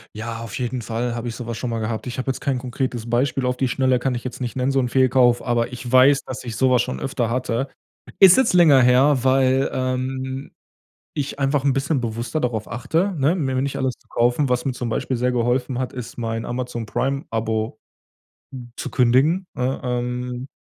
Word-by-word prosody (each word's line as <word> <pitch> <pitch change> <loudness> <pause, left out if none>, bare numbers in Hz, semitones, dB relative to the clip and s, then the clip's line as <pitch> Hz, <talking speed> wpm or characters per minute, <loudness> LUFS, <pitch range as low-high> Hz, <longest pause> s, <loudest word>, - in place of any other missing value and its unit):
Ja 115 +1 -5
auf 115 +2 -6
jeden 125 0 -2
Fall 115 +1 -3
habe 120 0 -4
ich 110 - -6
sowas 120 -2 -5
schon 125 - -3
mal 115 - -2
gehabt. 110 -1 -3
Ich 125 - -5
habe 130 - -4
jetzt 130 - -2
kein 135 -3 0
konkretes 125 -2 -3
Beispiel 130 +2 +1
auf 125 - 0
die 130 0 0
Schnelle 130 0 +2
kann 130 +1 -1
ich 120 0 -5
jetzt 130 - -6
nicht 125 +1 -4
nennen 130 +2 +1
so 135 - +3
'n 125 - -1
Fehlkauf, 125 -1 +4
aber 120 0 0
ich 125 0 -7
weiß, 130 +3 +5
dass 130 - -7
ich 115 -4 -6
sowas 130 -2 +4
schon 65 - -4
öfter 115 - -2
hatte. 125 +2 -1 0.5
Ist 190 -2 +9
jetzt 260 - +3
länger 160 -7 +6
her, 130 +3 +5
weil, 130 0 +3
ähm, 130 +1 -3 0.6
ich 145 -1 -3
einfach 135 0 +1
'n 140 -2 +3
bisschen 135 +1 0
bewusster 120 +6 -3
darauf 115 -5 -2
achte, 165 - -1
ne, 145 +6 +3
Mir 130 -7 -1
nicht 140 0 -2
alles 130 -1 0
zu - - -32
kaufen, 125 +4 +1
was 125 0 0
mir 135 - 0
zum 125 -1 -4
Beispiel 120 +2 -2
sehr 125 +1 +1
geholfen 125 +1 0
hat, 130 -1 -3
ist 125 -2 -7
mein 115 -1 -3
Amazon-Prime-Abo 115 -2 -2 1.0
zu - - -5
kündigen, 140 +9 +3
ne? 130 +1 -2
Ähm 125 +1 -3
125 Hz, 200 wpm, -22 LUFS, 120-135 Hz, 1.0 s, Ist